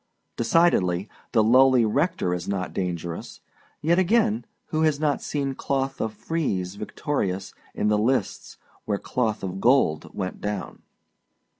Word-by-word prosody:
Decidedly, 110 - +2 0.2
the 110 -3 +4
lowly 130 +1 +5
rector 140 - 0
is 90 -1 -4
not 95 -2 -2
dangerous; 85 -3 -4 0.4
yet, 170 +4 +3
again, 220 +4 +2 0.2
who 155 - 0
has 155 -2 +2
not 150 -2 +1
seen 140 -2 -2
Cloth 135 0 -2
of 110 - -1
Frieze 105 - -2
victorious 100 - -3 0.2
in - - 0
the 105 0 +3
lists 125 +5 -1 0.3
where 105 -2 0
Cloth 110 -1 -2
of 95 0 -4
Gold 120 - +3
went 95 -2 -4
down? 105 -2 -4
115 Hz, 135 wpm, -25 LUFS, 95-145 Hz, 0.4 s, lowly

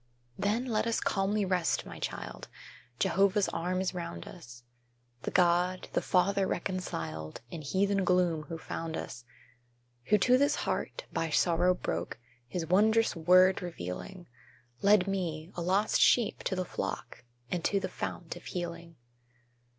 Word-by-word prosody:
Then 210 +5 0
let 225 -2 0
us 230 - +1
calmly 200 +1 0
rest, 180 -3 0
my - - -9
child, - - -5 0.5
Jehovah's 200 +1 +3
arm 180 +2 -1
is 190 - -1
round 170 -1 -6
us, 120 -9 -12 0.6
The - - -3
God, 180 +1 +2
the - - +2
Father 195 +1 +2
reconciled, 80 - -4
In 165 - -6
heathen 195 +6 +1
gloom 180 -3 +2
who 165 - -4
found 160 0 -5
us; 120 -1 -7 0.8
Who 210 - +4
to 250 +6 +4
this 285 +1 +3
heart, - - -3
by 165 - -1
sorrow 175 +3 +3
broke, 85 - -3 0.3
His 170 +5 -3
wondrous 220 +6 +3
WORD 185 +3 +5
revealing, 175 - -6 0.6
Led 200 -1 +5
me, 170 -4 -3
a 175 - -5
lost 190 +5 +2
sheep, 235 -4 +4
to 190 - 0
the 185 0 -1
flock, - - -5 0.3
And 175 -2 -1
to 200 - +2
the - - -3
Fount - - -5
of - - -12
Healing. 170 -2 -5
180 Hz, 145 wpm, -30 LUFS, 165-195 Hz, 0.8 s, WORD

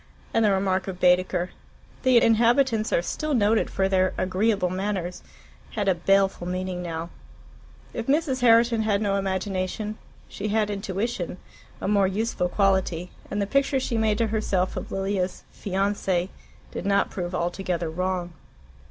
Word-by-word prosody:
And 225 - +3
the 210 - +4
remark 190 -1 +1
of 185 -2 -5
Baedeker, 180 0 +2 0.5
"The 255 -2 +5
inhabitants 230 0 +3
are 170 - +2
still 305 - -2
noted 215 -1 +2
for 190 - +1
their 185 -1 +2
agreeable 190 0 +1
manners," 185 -2 -3 0.5
had 205 -2 -1
a 190 - +5
baleful 195 0 +2
meaning 185 0 -3
now. 165 -1 -5 0.8
If 230 - -4
Mrs. 275 -2 +1
Herriton 230 -1 +5
had 210 -2 +1
no 200 -2 0
imagination, 195 +2 -2 0.3
she 205 - -5
had 210 0 +1
intuition, 195 -1 -3 0.4
a - - -3
more 200 -1 +3
useful 195 -2 -1
quality, 190 -3 +1 0.2
and 205 - -2
the 200 - +1
picture 275 +4 +1
she 245 - -2
made 220 -2 +2
to 230 - +2
herself 205 -4 0
of - - -6
Lilia's 195 -1 -2
FIANCE 195 -2 -1 0.4
did - - -5
not 200 0 +2
prove 180 -1 -4
altogether 175 -1 -2
wrong. 180 +1 -2
195 Hz, 150 wpm, -25 LUFS, 185-220 Hz, 0.8 s, The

